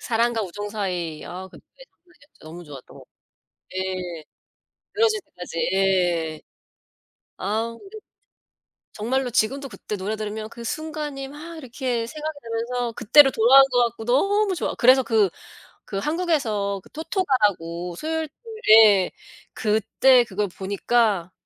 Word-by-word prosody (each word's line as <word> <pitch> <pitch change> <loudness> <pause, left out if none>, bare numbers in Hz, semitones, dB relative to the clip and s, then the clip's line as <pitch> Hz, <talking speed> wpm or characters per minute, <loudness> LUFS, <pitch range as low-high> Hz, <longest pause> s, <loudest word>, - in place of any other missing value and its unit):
사랑과 230 -1 0
우정 205 +2 -6
사이. 180 -7 -3
아 185 +1 -8
그때 - - -17 0.3
정말 355 -1 -28 0.3
너무 170 +3 -10
좋았죠. 140 -4 -12 0.7
예. 185 -3 -4 0.7
늘어질 435 0 +2
때까지. 180 - -8
예. 175 -5 +1 1.0
아 225 +4 -2
근데 410 +2 -11 0.9
정말로 250 +4 -1
지금도 270 +5 0
그때 210 - -6
노래 205 +3 -3
들으면 215 0 -5
그 235 0 -10
순간이 295 -1 -5
막 320 +4 -10
이렇게 245 -4 -3
생각이 310 +2 -6
나면서 235 +1 -3
그때로 270 +6 +6
돌아간 260 +4 +7
것 245 -1 +4
같고 235 -1 -4
너무 395 - +2
좋아. 335 - -3
그래서 260 +2 +5
그 220 -5 +2 0.6
그 195 - -3
한국에서 230 - -1
그 - - -20
토토가라고 210 - -1
수요일 320 - -3
토 280 - -35 0.5
예. 195 -3 +3 0.4
그때 220 +4 +3
그걸 210 -2 -2
보니까 195 0 0
225 Hz, 265 characters per minute, -23 LUFS, 195-275 Hz, 1.0 s, 돌아간